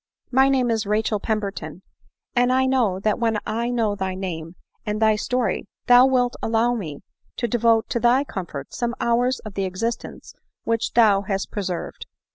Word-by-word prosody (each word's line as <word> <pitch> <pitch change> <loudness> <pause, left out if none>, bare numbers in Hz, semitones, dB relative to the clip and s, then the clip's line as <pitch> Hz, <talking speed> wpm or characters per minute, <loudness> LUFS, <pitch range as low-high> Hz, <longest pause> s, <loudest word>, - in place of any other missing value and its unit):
My 265 +1 +5
name 255 -3 +2
is 220 -3 -1
Rachel 215 0 0
Pemberton; 195 -6 -4 0.5
and 245 0 +3
I 260 +1 +3
hope 225 -8 +1
that 215 -1 +1
when 225 -2 +1
1 235 +2 -2
know 220 -3 +1
thy 190 -2 -3
name, 170 -3 -5 0.3
and 210 0 -2
thy 220 -1 +4
story, 250 0 -1 0.2
thou 245 +1 +7
wilt 250 -2 +1
allow 230 +2 +1
me 160 -11 -5 0.3
to 240 - -1
devote 230 -1 +2
to 235 - 0
thy 245 +4 +4
comfort 170 - -7
some 240 -1 -2
hours 245 +2 +1
of 215 - -9
the 195 0 -1
existence 225 +6 -4 0.3
which 230 -1 -1
thou 210 -4 +5
hast 195 -1 -3
preserved." 185 -4 -4
225 Hz, 170 wpm, -23 LUFS, 195-240 Hz, 0.5 s, thou